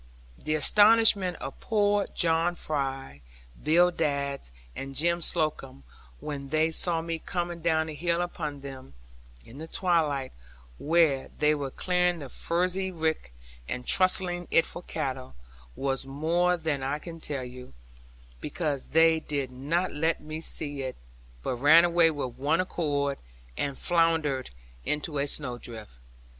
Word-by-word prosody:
The 155 - -2
astonishment 205 +1 +5
of 135 - -7
poor 205 -2 +1
John 165 +1 +2
Fry, 135 - -4 0.4
Bill 175 +4 +5
Dadds, 140 - -2 0.3
and 135 0 -6
Jem 170 +4 +1
Slocombe, 155 - -2 0.4
when 140 -2 -6
they 155 +2 +2
saw 165 0 0
me 165 0 -3
coming 175 0 -3
down 160 -1 +2
the 160 - -6
hill 170 +2 0
upon 155 -5 -4
them, 130 - -10 0.5
in 130 +5 -12
the 160 - -6
twilight, 155 -8 0 0.5
where 155 -4 +2
they 150 0 +3
were 145 -2 -3
clearing 180 +4 +1
the 140 -4 -8
furze 175 +7 0
rick 165 - -2 0.4
and 125 0 -4
trussing 185 -2 +2
it 165 - +4
for - - -6
cattle, 130 - -4 0.4
was 135 -1 -2
more 170 +6 +1
than 155 -4 -2
I 135 +2 -1
can 165 +1 -9
tell 140 -4 -4
you; 125 - -10 0.6
because 145 - -3
they 160 +1 +4
did 140 -4 -3
not 150 +8 -1
let 160 +3 0
me 155 +1 -6
see 145 -3 -3
it, 130 -1 -4 0.5
but 125 - -2
ran 155 +6 +7
away 170 -1 +5
with 130 -5 -4
one 150 +5 +2
accord, 145 -6 -1 0.4
and 140 - -2
floundered 165 -6 +1 0.3
into 150 - -2
a 140 - 0
snowdrift. 120 - -5
155 Hz, 140 wpm, -28 LUFS, 140-170 Hz, 0.6 s, ran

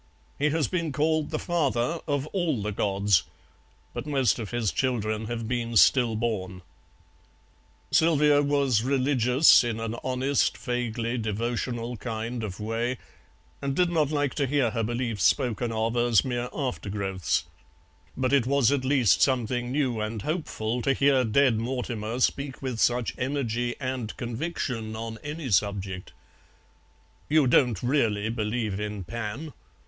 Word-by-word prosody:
He 150 +2 +3
has 150 -3 +1
been 170 -4 -2
called 155 +2 +1
the 155 - -2
Father 155 -3 0
of 145 -2 0
all 165 - 0
the 105 - -2
Gods, 100 -2 +2 0.7
but - - -5
most 135 -6 +2
of 110 -3 -5
his 120 -5 -1
children 110 - -1
have 115 0 -4
been 120 -1 -2
stillborn." 110 -7 +2 1.3
Sylvia 150 -3 +4
was 140 -5 +2
religious 130 +1 +4
in 115 -2 -2
an 115 0 -3
honest 130 +2 +1
vaguely 120 -1 -2
devotional 115 +2 -3
kind 115 +1 -4
of 100 -3 -5
way, 115 +4 -2 0.6
and 140 -1 -2
did 180 +1 +2
not 155 -4 +2
like 145 -3 0
to 140 -2 0
hear 130 -4 +1
her 115 0 -1
beliefs 115 -3 -2
spoken 120 +4 +1
of 115 +1 -1
as 120 -2 +3
mere 125 -1 -2
aftergrowths, 100 - -2 0.7
but 130 +1 0
it 135 -4 +3
was 140 -2 +3
at 140 -2 0
least 130 -5 +3
something 125 -1 +1
new 130 -5 0
and 110 0 -4
hopeful 125 -8 -2
to 135 - +2
hear 135 -2 +3
Dead 120 0 +3
Mortimer 120 -1 -3
speak 140 +1 0
with 130 -4 -4
such 120 0 +2
energy 120 -3 -1
and 130 -4 -4
conviction 120 -3 -3
on 110 0 -6
any 150 -3 -5
subject. 95 -2 -1 1.2
"You 155 -2 +4
don't 125 -4 +3
really 110 -5 +1
believe 110 -2 -2
in 105 -2 -4
Pan?" 115 - -5
120 Hz, 140 wpm, -26 LUFS, 110-140 Hz, 1.3 s, Sylvia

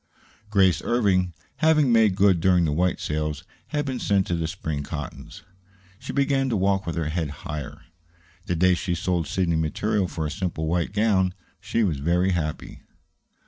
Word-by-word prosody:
Grace 95 -5 +3
Irving, 95 -7 +1 0.3
having 155 -5 +4
made 110 -4 +4
good 95 -3 +4
during 90 -1 +4
the 75 - 0
white 90 +4 +1
sales, 75 -1 -3 0.2
had 150 -2 -2
been 130 -3 -3
sent 100 -2 +2
to - - -2
the 85 -1 -2
spring 80 -4 -4
cottons. 75 -1 -7 0.6
She - - -6
began 140 -1 +1
to 115 - 0
walk 95 -1 +1
with 85 - -2
her 80 -2 -1
head 80 -1 -2 0.2
higher. 75 +1 -6 0.6
The 90 - 0
day 90 +2 +4
she 90 0 -1
sold 90 -4 -1
Sidney 85 0 0
material 95 +5 0
for 80 -2 -4
a 75 - -3
simple 85 -3 -3
white 85 +2 0
gown, 100 -3 +2 0.2
she 115 +3 0
was 80 -9 0
very 90 +5 +2
happy. 80 -4 -3
90 Hz, 175 wpm, -24 LUFS, 80-100 Hz, 0.6 s, having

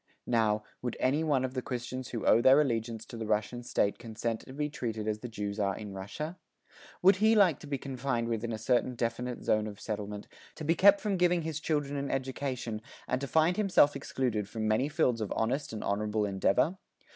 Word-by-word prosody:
Now, 110 -3 +2 0.2
would 120 -2 -3
any 140 +5 +2
one 140 -5 +2
of 130 - -5
the 130 - -2
Christians 125 0 -5
who 115 - -4
owe 115 - +6
their 130 +3 +7
allegiance 115 -5 -1
to 115 - -9
the 110 -1 -4
Russian 110 +3 0
state 105 -4 0
consent 115 0 -3
to - - -13
be 150 +2 -1
treated 115 -7 -4
as 105 0 -1
the 125 - -6
Jews 105 -2 -4
are 100 -1 0
in 105 -2 -7
Russia? 150 - -6 0.6
Would 190 +1 +7
he 220 +3 +4
like 190 -8 +5
to - - -11
be 140 -1 -1
confined 130 -3 -2
within 115 0 -2
a 110 - -2
certain 125 +2 +1
definite 120 +1 -3
zone 110 0 +2
of 105 -1 -8
settlement, 105 -1 -5 0.3
to - - -7
be 165 - +4
kept 200 +3 +6
from 205 -3 0
giving 175 -1 +3
his 160 -1 -3
children 145 -2 -1
an 140 0 -2
education, 130 -4 -3 0.3
and 130 +1 -1
to 140 - -3
find 160 +6 +3
himself 195 -8 +4
excluded 110 -6 -2
from 110 -1 -2
many 110 +7 +2
fields 125 -7 +1
of 105 - -3
honest 130 +6 -1
and 110 - -5
honourable 105 +1 0
endeavour? 100 - +1
125 Hz, 210 wpm, -30 LUFS, 110-145 Hz, 0.6 s, their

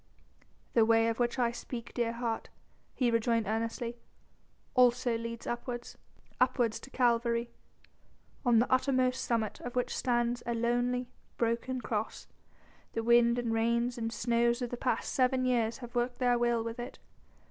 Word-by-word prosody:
"The 230 - +5
way 225 0 +4
of 230 - -3
which 240 +1 +1
I 240 -2 +2
speak, 235 0 -7
dear 235 -1 0
heart," 235 -1 -3 0.5
he 245 -3 +2
rejoined 230 -1 +2
earnestly, 230 +2 -2 0.8
"also 250 -1 +4
leads 230 0 -5
upwards, 240 0 -4 0.4
upwards 245 -3 +2
to - - -12
Calvary, 235 -2 +1 0.9
on 240 -3 +4
the 235 - +2
uttermost 255 -1 +2
summit 225 -3 -1
of 245 +1 -7
which 250 - 0
stands 240 -1 0
a 235 - 0
lonely, 245 +1 0 0.3
broken 235 +2 -1
Cross. 220 -2 -3 0.7
The 225 - -2
wind 235 0 +5
and 235 -2 -1
rains 235 +2 +1
and 225 -1 -3
snows 235 +1 +1
of 240 - -4
the - - -2
past 250 +1 -1
seven 255 0 +2
years 235 -3 +1
have 240 - -14
worked 245 0 -1
their 245 -1 +2
will 240 -1 +2
with 230 +1 -5
it.... 240 +1 -6
240 Hz, 155 wpm, -31 LUFS, 230-245 Hz, 0.9 s, The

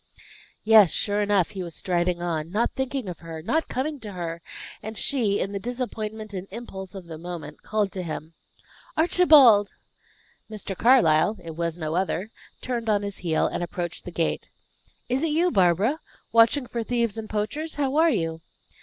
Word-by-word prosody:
Yes, 215 -4 +7
sure 205 +4 0
enough 205 -2 +2
he 195 -3 -5
was 170 -3 -5
striding 175 -1 0
on, 165 -2 -2
not 215 +6 0
thinking 265 -3 -3
of 175 -3 -6
her, 165 -1 -8
not 320 - 0
coming 285 +3 -3
to 210 -4 -8
her; 170 -2 -5 0.4
and 220 +1 -7
she, 220 -8 +1
in 195 - -1
the 200 - -3
disappointment 220 -2 -4
and 190 0 -5
impulse 190 -4 -8
of 190 -2 -8
the 160 -2 -8
moment, 165 -3 -7
called 210 -2 -1
to 185 - -4
him, 160 -1 -6 0.6
"Archibald!" 300 - +6 0.8
Mr. 210 -3 -5
Carlyle 215 -4 +4
it 165 -1 -7
was 170 0 -2
no 155 -2 -3
other 190 +3 -1 0.3
turned 235 -3 -3
on 205 -1 +2
his 200 -1 -5
heel, 165 -3 +1
and - - -2
approached 175 0 -4
the 180 - -7
gate. 165 -1 -2 0.6
"Is 255 +2 0
it 325 - +1
you, 340 +4 +2
Barbara! 195 - +3 0.3
Watching 230 +4 +4
for 235 -1 -4
thieves 235 -2 0
and 220 -1 -6
poachers? 285 +10 -3
How 280 -1 -1
are 330 +1 +5
you?" 165 - -1
205 Hz, 175 wpm, -25 LUFS, 175-240 Hz, 0.8 s, Yes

